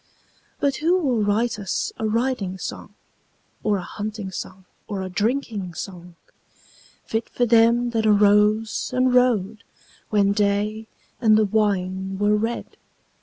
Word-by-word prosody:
But 280 Hz, -2 st, +1 dB
who 340 Hz, +4 st, +2 dB
will 260 Hz, -10 st, 0 dB
write 215 Hz, +2 st, 0 dB
us 195 Hz, -, -2 dB
a 220 Hz, -, 0 dB
riding 220 Hz, -4 st, -1 dB
song, -, -, -7 dB, 0.7 s
Or 210 Hz, -2 st, +1 dB
a 185 Hz, -, -5 dB
hunting 210 Hz, 0 st, -6 dB
song 190 Hz, 0 st, -8 dB, 0.2 s
or 200 Hz, -3 st, -4 dB
a 185 Hz, -, -5 dB
drinking 210 Hz, -3 st, -2 dB
song, 180 Hz, -2 st, -8 dB, 0.9 s
Fit 225 Hz, +1 st, -3 dB
for 245 Hz, -, 0 dB
them 235 Hz, +1 st, +4 dB
that 220 Hz, -2 st, 0 dB
arose 210 Hz, +1 st, +3 dB
and 255 Hz, 0 st, +2 dB
rode 225 Hz, -4 st, +2 dB, 0.5 s
When 200 Hz, -2 st, +3 dB
day 210 Hz, +2 st, 0 dB, 0.3 s
and 215 Hz, -3 st, +5 dB
the 215 Hz, -, +3 dB
wine 190 Hz, -2 st, -1 dB
were 205 Hz, +1 st, +2 dB
red? 225 Hz, +3 st, -3 dB
215 Hz, 135 wpm, -23 LUFS, 200-230 Hz, 0.9 s, and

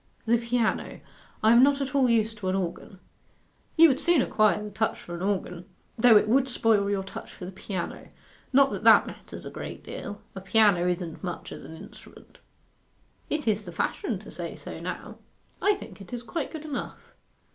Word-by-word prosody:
'The 230 Hz, +1 st, +3 dB
piano. 235 Hz, -1 st, -1 dB, 0.4 s
I 220 Hz, -, +6 dB
am 235 Hz, +1 st, +7 dB
not 280 Hz, +1 st, +4 dB
at 275 Hz, 0 st, -3 dB
all 265 Hz, -3 st, +3 dB
used 225 Hz, -1 st, +1 dB
to 190 Hz, -, -4 dB
an 185 Hz, -, 0 dB
organ.' 190 Hz, +1 st, -4 dB, 0.8 s
'You 330 Hz, +1 st, +9 dB
would 265 Hz, -, +1 dB
soon 345 Hz, -7 st, +3 dB
acquire 215 Hz, -1 st, +2 dB
the 210 Hz, -, -7 dB
touch 220 Hz, +2 st, -1 dB
for 175 Hz, -, -9 dB
an 170 Hz, -, -5 dB
organ, 180 Hz, -3 st, -2 dB, 0.3 s
though 225 Hz, -1 st, +7 dB
it 210 Hz, -, +2 dB
would 260 Hz, +4 st, +3 dB
spoil 220 Hz, -4 st, +2 dB
your 200 Hz, -1 st, 0 dB
touch 190 Hz, -, -9 dB
for 180 Hz, -, -9 dB
the 185 Hz, -, -7 dB
piano. 190 Hz, -1 st, -5 dB, 0.4 s
Not 275 Hz, +1 st, +5 dB
that -, -, -5 dB
that -, -, +7 dB
matters -, -, -9 dB
a -, -, -7 dB
great -, -, -7 dB
deal. 205 Hz, -, -7 dB
A 190 Hz, -, -7 dB
piano 195 Hz, -3 st, +4 dB
isn't 175 Hz, -1 st, -3 dB
much 175 Hz, -2 st, -5 dB
as -, -, -8 dB
an 160 Hz, -, -10 dB
instrument.' -, -, -15 dB, 0.9 s
'It 300 Hz, -4 st, -2 dB
is 215 Hz, -1 st, +1 dB
the -, -, -7 dB
fashion -, -, -2 dB
to -, -, -12 dB
say -, -, -5 dB
so -, -, -8 dB
now. -, -, -6 dB, 0.4 s
I 410 Hz, 0 st, +4 dB
think 300 Hz, -, -11 dB
it 195 Hz, -, -12 dB
is 245 Hz, -1 st, -5 dB
quite 280 Hz, +6 st, -3 dB
good 315 Hz, -1 st, -8 dB
enough. 300 Hz, -, -6 dB
220 Hz, 200 wpm, -27 LUFS, 190-255 Hz, 0.9 s, You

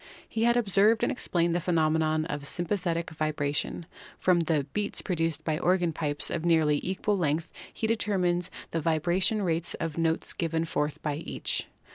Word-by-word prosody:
He 225 Hz, +1 st, 0 dB
had 235 Hz, 0 st, +4 dB
observed 210 Hz, 0 st, +3 dB
and -, -, +2 dB
explained 175 Hz, -9 st, 0 dB
the 175 Hz, -, +1 dB
phe 180 Hz, -, -5 dB
nomenon 155 Hz, 0 st, +2 dB
of 145 Hz, -3 st, -4 dB
sympathetic 170 Hz, -1 st, -1 dB
vibration. 155 Hz, +1 st, -2 dB, 0.3 s
From 180 Hz, -2 st, +3 dB
the 160 Hz, -3 st, +1 dB
"beats" 205 Hz, -1 st, 0 dB
produced 165 Hz, -4 st, -1 dB
by 155 Hz, -1 st, -1 dB
organ 175 Hz, -2 st, +2 dB
pipes 150 Hz, -2 st, -2 dB
of 165 Hz, -, -2 dB
nearly 160 Hz, -3 st, +3 dB
equal 195 Hz, +2 st, -1 dB
length 160 Hz, 0 st, -1 dB, 0.2 s
he -, -, -3 dB
deter 215 Hz, -2 st, 0 dB
mined 175 Hz, -1 st, +1 dB, 0.2 s
the 165 Hz, -, -1 dB
vibration 175 Hz, +7 st, +1 dB
rates 170 Hz, -2 st, 0 dB
of 165 Hz, -2 st, -3 dB
the 165 Hz, -, -2 dB
notes 165 Hz, 0 st, 0 dB
given 165 Hz, -1 st, -1 dB
forth 150 Hz, -2 st, -2 dB
by 150 Hz, -2 st, -1 dB
each. 160 Hz, -, -3 dB
165 Hz, 175 wpm, -28 LUFS, 155-185 Hz, 0.3 s, had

